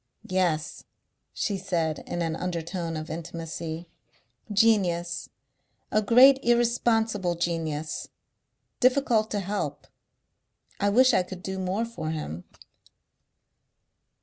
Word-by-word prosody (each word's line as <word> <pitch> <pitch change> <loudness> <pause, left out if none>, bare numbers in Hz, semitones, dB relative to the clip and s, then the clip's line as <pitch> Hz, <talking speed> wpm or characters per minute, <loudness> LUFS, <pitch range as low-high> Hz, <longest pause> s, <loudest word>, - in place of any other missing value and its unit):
"Yes," 170 -5 0 0.5
she 200 -2 -2
said 170 -5 -1
in 175 - -2
an 165 -1 -1
undertone 170 -1 -3
of 155 0 -6
intimacy. 165 0 -6 0.6
"Genius.... 185 -5 +2 0.6
A 215 - +3
great 255 +5 +7
irresponsible 225 -5 +2
genius.... 160 -3 -2 0.7
Difficult 250 -4 +3
to 205 - -1
help.... 200 +2 -3 0.9
I 205 - +2
wish 255 +4 +5
I 190 - +4
could 180 0 -8
do 190 0 -4
more 190 +5 -1
for 230 -9 -5
him." 150 - -5
185 Hz, 100 wpm, -27 LUFS, 165-220 Hz, 0.9 s, great